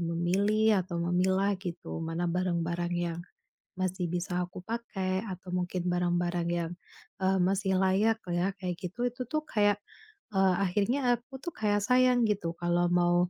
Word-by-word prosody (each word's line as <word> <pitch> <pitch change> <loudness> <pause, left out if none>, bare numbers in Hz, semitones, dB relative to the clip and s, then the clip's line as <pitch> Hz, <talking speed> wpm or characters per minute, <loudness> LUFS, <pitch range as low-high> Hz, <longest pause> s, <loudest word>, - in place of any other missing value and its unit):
memilih 195 +5 +2
atau 175 -1 -5
memilah, 190 +3 +2
gitu, 175 -3 -6
mana 165 +2 -2
barang-barang 175 -1 -1
yang 175 -1 -1 0.6
masih 185 0 -1
bisa 180 0 -1
aku 180 +1 -9
pakai 190 -3 -2
atau 185 -3 -7
mungkin 180 0 -1
barang-barang 175 -1 0
yang, 170 -1 -1 0.5
eee, 190 0 +2
masih 190 +1 +2
layak 210 +4 +3
ya, 175 +3 +1
kayak 180 -2 -2
gitu. 240 +8 -2
Itu 250 +1 -6
tuh 305 +6 -1
kayak, 205 -2 +3 0.6
eee, 190 -2 +4
akhirnya 205 +9 +1 0.2
aku 250 +3 -12
tuh 345 - -5
kayak 205 -1 +1
sayang 250 +1 +4
gitu 190 -5 -1
kalau 175 +1 +1
mau, 175 0 +4
185 Hz, 150 wpm, -30 LUFS, 175-205 Hz, 0.6 s, eee